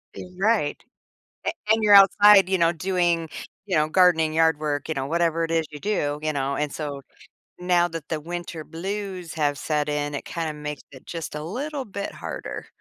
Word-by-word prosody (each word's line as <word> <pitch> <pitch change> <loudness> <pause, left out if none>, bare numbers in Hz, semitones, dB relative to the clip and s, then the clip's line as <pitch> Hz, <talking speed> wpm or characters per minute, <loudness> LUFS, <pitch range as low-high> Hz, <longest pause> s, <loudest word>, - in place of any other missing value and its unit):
Your 180 - -8
right. 200 -7 +1 0.7
And - - 0 0.2
and 220 0 +3
you're 210 -1 +6
outside, 195 0 +7
you 190 - +2
know, 170 -1 +3
doing, 175 -1 0 0.4
you 190 -3 -1
know, 155 0 +2
gardening, 160 -3 +4
yard 160 -1 +3
work, 145 -2 -2
you 160 - -2
know, 135 -1 -2
whatever 165 +1 +1
it 165 - -2
is 165 -1 +1
you 150 - -8
do, 150 -8 -1
you 155 0 -1
know, 140 -1 -1
and 150 -1 -2
so, 145 -3 -5 0.6
now 180 -1 +2
that 165 -2 -7
the 160 - -1
winter 170 0 -6
blues 185 +1 -5
have 145 -3 0
set 150 0 -1
in, 145 0 -2
it 140 - -5
kinda 165 -3 -3
makes 150 -1 -6
it 130 - -14
just 165 -2 -6
a 150 - -5
little 270 - -4
bit 200 -1 -5
harder. - - -7
165 Hz, 195 wpm, -24 LUFS, 150-185 Hz, 0.7 s, outside